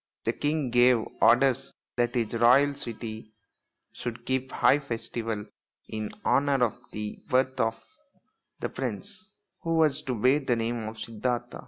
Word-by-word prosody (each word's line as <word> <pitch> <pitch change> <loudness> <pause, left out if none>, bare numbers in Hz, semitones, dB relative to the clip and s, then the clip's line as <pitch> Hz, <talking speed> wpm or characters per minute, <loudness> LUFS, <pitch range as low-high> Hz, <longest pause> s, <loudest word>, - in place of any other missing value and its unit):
The - - +1
king 145 -3 -1
gave 120 -1 +5 0.2
orders 135 +3 +4 0.2
that 120 0 0
his 115 -2 0
royal 125 +5 +5
city 110 -4 -7 0.6
should 120 0 -6
keep 130 0 -1
high 140 - +4
festival 115 -4 -4 0.4
in 110 -1 -4 0.2
honour 140 -3 +3
of 110 - -5
the 105 0 -5
birth 130 0 +1
of 115 -1 +1 0.8
the - - -2
prince, 185 - -6 0.3
who 165 -2 -1
was 155 -4 +3
to 130 - -3
bear 130 +6 +4
the 130 -4 0
name 115 -1 -2
of 110 +1 -7
Siddartha. 115 +2 -3
120 Hz, 145 wpm, -28 LUFS, 115-135 Hz, 0.8 s, gave